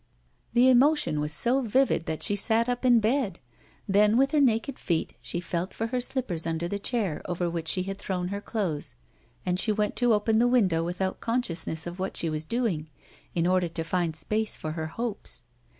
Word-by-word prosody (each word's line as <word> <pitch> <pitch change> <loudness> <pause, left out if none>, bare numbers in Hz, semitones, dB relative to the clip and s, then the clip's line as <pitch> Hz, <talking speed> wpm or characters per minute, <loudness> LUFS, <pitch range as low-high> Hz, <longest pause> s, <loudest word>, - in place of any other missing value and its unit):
The 245 +1 +5
emotion 260 - +4
was 150 0 -1
so 245 - +2
vivid 255 -6 +1
that 160 - -2
she 205 - +2
sat 225 +3 +2
up 245 +1 -2
in 245 -1 +6
the - - +6
bed; 220 -4 0 0.5
then, 210 +2 +4
with 270 +1 +3
her 300 -2 +3
naked 250 +1 +1
feet, 165 -3 -1
she 175 - -3
felt 175 +1 -3
for 225 - -2
her 250 - +1
slippers 215 -11 -1
under 165 +1 -1
the 200 +3 -3
chair 205 -7 -1
over 175 0 -2
which 165 -1 -3
she 185 +2 +1
had 195 +1 -5
thrown 180 -2 -3
her 200 +1 -4
clothes, 180 - -3 0.5
and 180 0 0
she 215 - +2
went 210 0 0
to 245 -2 +4
open 220 +1 +2
the 240 - +4
window 190 -10 +3
without 180 +2 -2
consciousness 180 -9 -1
of 175 +2 -7
what 190 +1 -2
she 165 - +1
was 155 0 -3
doing, 185 -8 -1 0.5
in 170 -1 +1
order 180 0 +2
to 165 0 -4
find 170 -1 -1
space 215 +6 -1
for 155 - -4
her 160 0 -4
hopes. 230 +6 -5
195 Hz, 205 wpm, -27 LUFS, 170-235 Hz, 0.5 s, in